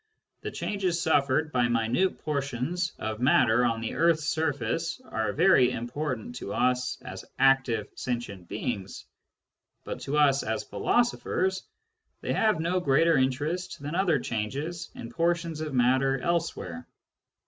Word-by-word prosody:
The -, -, -4 dB
changes 185 Hz, -4 st, -2 dB
suffered 155 Hz, -2 st, +2 dB
by 125 Hz, -3 st, +2 dB
minute 120 Hz, +10 st, +1 dB
portions 145 Hz, +4 st, -2 dB
of 110 Hz, 0 st, -4 dB
matter 120 Hz, -2 st, +4 dB
on 115 Hz, -2 st, +1 dB
the 115 Hz, -, -3 dB
earth's 165 Hz, -1 st, +3 dB
surface 160 Hz, -, -1 dB
are 110 Hz, -, -2 dB
very 150 Hz, -, +5 dB
important 125 Hz, 0 st, -4 dB
to 100 Hz, -, -5 dB
us 125 Hz, 0 st, +1 dB
as -, -, -7 dB
active 135 Hz, -5 st, +3 dB
sentient 110 Hz, -8 st, -4 dB
beings; 100 Hz, -5 st, -4 dB, 0.8 s
but -, -, -5 dB
to 145 Hz, +2 st, -2 dB
us 140 Hz, -2 st, +4 dB
as 110 Hz, 0 st, -2 dB
philosophers 190 Hz, -5 st, 0 dB, 0.6 s
they -, -, -1 dB
have 215 Hz, -6 st, +2 dB
no 175 Hz, +3 st, +1 dB
greater 165 Hz, +1 st, +3 dB
interest 145 Hz, +7 st, -1 dB
than 145 Hz, +2 st, -5 dB
other 175 Hz, -3 st, +2 dB
changes 140 Hz, +9 st, -4 dB
in 115 Hz, -, -8 dB
portions 165 Hz, +1 st, 0 dB
of 155 Hz, -1 st, -3 dB
matter 130 Hz, +2 st, +3 dB
elsewhere. 160 Hz, -, -2 dB
140 Hz, 135 wpm, -28 LUFS, 120-165 Hz, 0.8 s, very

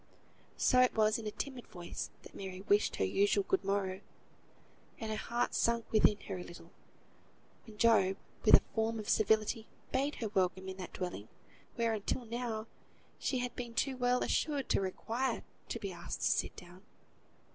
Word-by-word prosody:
So 255 Hz, -, +4 dB
it 255 Hz, -, +4 dB
was 215 Hz, 0 st, +3 dB
in 220 Hz, -, -5 dB
a -, -, -2 dB
timid 260 Hz, +1 st, -5 dB
voice 175 Hz, -1 st, -6 dB
that -, -, -13 dB
Mary 190 Hz, -1 st, -6 dB
wished 205 Hz, +1 st, +3 dB
her -, -, +1 dB
usual 200 Hz, -, +3 dB
good 190 Hz, -, +2 dB
morrow, 195 Hz, -1 st, -1 dB, 1.0 s
and 220 Hz, -1 st, -4 dB
her -, -, 0 dB
heart 235 Hz, +3 st, -1 dB
sank 235 Hz, -1 st, +2 dB
within 210 Hz, -1 st, +5 dB
her 190 Hz, -2 st, -5 dB
a -, -, -5 dB
little, 175 Hz, -, -12 dB, 1.0 s
when 215 Hz, -1 st, -12 dB
Job, 200 Hz, -4 st, +4 dB, 0.3 s
with -, -, +9 dB
a -, -, +3 dB
form 225 Hz, 0 st, 0 dB
of 215 Hz, -1 st, -6 dB
civility, 220 Hz, +2 st, +2 dB, 0.2 s
bade 275 Hz, +3 st, +1 dB
her 220 Hz, -, -3 dB
welcome 190 Hz, -1 st, 0 dB
in 190 Hz, 0 st, -5 dB
that 185 Hz, -2 st, -7 dB
dwelling, 180 Hz, -, -4 dB, 0.5 s
where, 230 Hz, -1 st, +1 dB
until 220 Hz, +4 st, -2 dB
now, 230 Hz, -1 st, -3 dB, 0.5 s
she 260 Hz, -, 0 dB
had 250 Hz, 0 st, -2 dB
been 240 Hz, -2 st, -6 dB
too 265 Hz, +3 st, +1 dB
well 250 Hz, 0 st, +2 dB
assured 290 Hz, -3 st, 0 dB
to -, -, +3 dB
require 230 Hz, +6 st, -2 dB, 0.3 s
to 230 Hz, -, -3 dB
be 200 Hz, -3 st, -4 dB
asked 175 Hz, -1 st, -6 dB
to -, -, +3 dB
sit -, -, 0 dB
down. 180 Hz, +1 st, -12 dB
215 Hz, 180 wpm, -34 LUFS, 190-235 Hz, 1.0 s, with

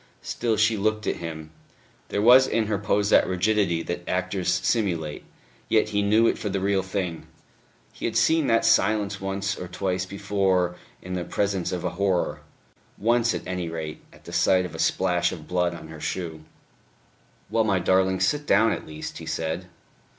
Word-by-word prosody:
Still 115 Hz, -2 st, -1 dB
she 110 Hz, 0 st, +3 dB
looked 110 Hz, +1 st, 0 dB
at -, -, -1 dB
him. 80 Hz, -2 st, -7 dB, 0.6 s
There 100 Hz, -, -1 dB
was 125 Hz, +3 st, +7 dB
in 110 Hz, 0 st, +1 dB
her 105 Hz, -2 st, -1 dB
pose 105 Hz, 0 st, +1 dB
that -, -, +5 dB
rigidity 95 Hz, -2 st, +1 dB
that 85 Hz, -, -4 dB
actors -, -, -1 dB
simulate; 85 Hz, -9 st, -1 dB, 0.5 s
yet 110 Hz, -1 st, +3 dB
he 105 Hz, -1 st, 0 dB
knew 105 Hz, +3 st, +4 dB
it -, -, +1 dB
for 105 Hz, -, -3 dB
the 100 Hz, 0 st, -1 dB
real 95 Hz, 0 st, +1 dB
thing. 95 Hz, -3 st, -4 dB, 0.7 s
He -, -, -6 dB
had -, -, -2 dB
seen 160 Hz, -3 st, +3 dB
that 115 Hz, 0 st, +3 dB
silence 100 Hz, -1 st, +2 dB
once 100 Hz, +1 st, -2 dB
or 90 Hz, -, -7 dB
twice 90 Hz, +1 st, -2 dB
before 95 Hz, -2 st, 0 dB, 0.3 s
in 90 Hz, -, -6 dB
the 90 Hz, -1 st, -2 dB
presence 95 Hz, -1 st, -1 dB
of 90 Hz, -2 st, -3 dB
a -, -, -1 dB
horror 95 Hz, -3 st, 0 dB, 0.6 s
once 115 Hz, +1 st, +2 dB
at -, -, -5 dB
any 90 Hz, -2 st, -3 dB
rate, 80 Hz, -2 st, -6 dB
at -, -, -19 dB
the -, -, -9 dB
sight 90 Hz, -1 st, +3 dB
of 90 Hz, -, -8 dB
a -, -, -8 dB
splash 90 Hz, -2 st, +1 dB
of 80 Hz, -4 st, -9 dB
blood 90 Hz, -1 st, 0 dB
on 80 Hz, -, -10 dB
her 80 Hz, -1 st, -10 dB
shoe. 80 Hz, -4 st, -4 dB, 1.1 s
"Well, 115 Hz, -, +3 dB
my 100 Hz, -3 st, +2 dB
darling, 95 Hz, +1 st, +2 dB
sit 145 Hz, 0 st, +1 dB
down, 110 Hz, +3 st, +4 dB
at -, -, -4 dB
least," 75 Hz, 0 st, -7 dB
he -, -, -9 dB
said. 80 Hz, +3 st, -3 dB
95 Hz, 185 wpm, -25 LUFS, 90-105 Hz, 1.1 s, was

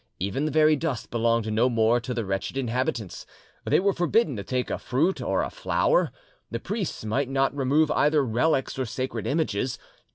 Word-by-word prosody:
Even 100 Hz, -, -2 dB
the 155 Hz, -, -1 dB
very 155 Hz, 0 st, +5 dB
dust 145 Hz, -5 st, -3 dB
belonged 115 Hz, -2 st, +1 dB
no 115 Hz, +4 st, +3 dB
more 115 Hz, 0 st, +3 dB
to 125 Hz, -, -6 dB
the 115 Hz, -3 st, -2 dB
wretched 95 Hz, +7 st, -3 dB
inhabitants; 120 Hz, -5 st, -2 dB, 0.4 s
they -, -, +3 dB
were 195 Hz, +1 st, +2 dB
forbidden 175 Hz, -, +1 dB
to 100 Hz, -, -5 dB
take 125 Hz, +5 st, -2 dB
a -, -, -2 dB
fruit 155 Hz, +9 st, 0 dB
or -, -, 0 dB
a -, -, -4 dB
flower, -, -, +1 dB, 0.4 s
the -, -, -3 dB
priests 205 Hz, -, -4 dB
might 130 Hz, +5 st, 0 dB
not 135 Hz, +1 st, +1 dB
remove 145 Hz, +3 st, +2 dB
either 150 Hz, -1 st, +3 dB
relics 130 Hz, +3 st, 0 dB
or 130 Hz, -, 0 dB
sacred 130 Hz, +4 st, -4 dB
images. 135 Hz, -6 st, -1 dB
130 Hz, 185 wpm, -26 LUFS, 115-155 Hz, 0.4 s, very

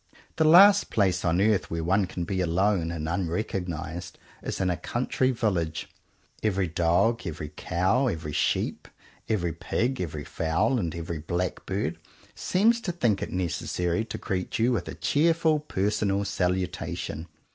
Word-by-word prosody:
The 160 Hz, -, +4 dB
last 195 Hz, +5 st, +7 dB
place 95 Hz, -4 st, +1 dB
on 85 Hz, +1 st, +2 dB
earth 100 Hz, -5 st, +2 dB
where 85 Hz, 0 st, -2 dB
one 95 Hz, +3 st, +2 dB
can 90 Hz, -1 st, -4 dB
be 95 Hz, +2 st, -1 dB
alone 90 Hz, 0 st, +1 dB
and 80 Hz, -2 st, -4 dB
unrecognized 85 Hz, -2 st, -3 dB, 0.2 s
is -, -, -4 dB
in 90 Hz, -1 st, +1 dB
a -, -, 0 dB
country 125 Hz, -, -1 dB
village. 95 Hz, -10 st, -1 dB, 0.5 s
Every 100 Hz, -3 st, +1 dB
dog, 90 Hz, +7 st, +2 dB
every 75 Hz, -2 st, -5 dB
cow, 95 Hz, -, +1 dB
every 80 Hz, -8 st, -3 dB
sheep, -, -, -1 dB, 0.4 s
every 85 Hz, -7 st, 0 dB
pig, 120 Hz, +9 st, -1 dB
every 75 Hz, -4 st, -4 dB
fowl, 80 Hz, -, 0 dB
and 85 Hz, -5 st, -2 dB
every 85 Hz, -1 st, -4 dB
blackbird, 90 Hz, +1 st, -2 dB, 0.3 s
seems 230 Hz, +5 st, +2 dB
to 195 Hz, -, -2 dB
think 120 Hz, -, +1 dB
it -, -, -3 dB
necessary 90 Hz, +1 st, -1 dB
to -, -, -6 dB
greet 90 Hz, -1 st, -3 dB
you 115 Hz, +3 st, +3 dB
with 100 Hz, -8 st, -1 dB
a -, -, -6 dB
cheerful 160 Hz, 0 st, +2 dB
personal 100 Hz, -6 st, 0 dB
salutation. 90 Hz, -3 st, -2 dB
95 Hz, 145 wpm, -27 LUFS, 85-110 Hz, 0.5 s, last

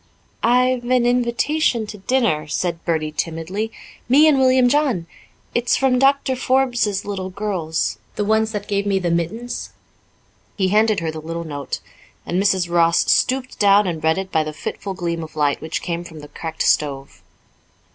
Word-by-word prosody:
"I've 250 Hz, +1 st, +2 dB
an 250 Hz, -1 st, +2 dB
invitation 245 Hz, +1 st, +1 dB
to 210 Hz, -1 st, -9 dB
dinner," 195 Hz, -, 0 dB
said 170 Hz, +2 st, -2 dB
Bertie 160 Hz, -2 st, -1 dB
timidly, 165 Hz, +8 st, -3 dB, 0.4 s
"me 290 Hz, +5 st, +6 dB
and 290 Hz, -3 st, +4 dB
William 255 Hz, -1 st, +4 dB
John. 260 Hz, -, +1 dB, 0.5 s
It's 240 Hz, 0 st, +2 dB
from 260 Hz, -2 st, +2 dB
Doctor 270 Hz, 0 st, +3 dB
Forbes's 245 Hz, -6 st, +1 dB
little 190 Hz, -2 st, -4 dB
girls 180 Hz, -, -2 dB, 0.2 s
the 210 Hz, -, -1 dB
ones 220 Hz, +1 st, +2 dB
that 205 Hz, -1 st, -5 dB
gave 200 Hz, 0 st, -1 dB
me 195 Hz, -1 st, +2 dB
the 180 Hz, -3 st, -1 dB
mittens." 185 Hz, +9 st, -3 dB, 0.8 s
He 190 Hz, -2 st, +1 dB
handed 215 Hz, -1 st, +3 dB
her 160 Hz, -1 st, -2 dB
the 155 Hz, 0 st, -7 dB
little 165 Hz, +2 st, -5 dB
note, 145 Hz, -4 st, -5 dB, 0.4 s
and 180 Hz, +2 st, 0 dB
Mrs. 190 Hz, -3 st, +2 dB
Ross 170 Hz, -1 st, +3 dB
stooped 255 Hz, 0 st, +1 dB
down 205 Hz, 0 st, +5 dB
and 165 Hz, -4 st, -3 dB
read 160 Hz, +2 st, +2 dB
it 190 Hz, 0 st, -4 dB
by 160 Hz, -, +2 dB
the 155 Hz, 0 st, -6 dB
fitful 195 Hz, +5 st, -5 dB
gleam 170 Hz, -2 st, -3 dB
of 155 Hz, 0 st, -11 dB
light 145 Hz, -2 st, +1 dB
which 160 Hz, -, -4 dB
came 170 Hz, -1 st, -3 dB
from 160 Hz, -3 st, -11 dB
the 145 Hz, -, -12 dB
cracked 160 Hz, +2 st, -4 dB
stove. 140 Hz, -2 st, 0 dB
195 Hz, 170 wpm, -20 LUFS, 165-240 Hz, 0.8 s, me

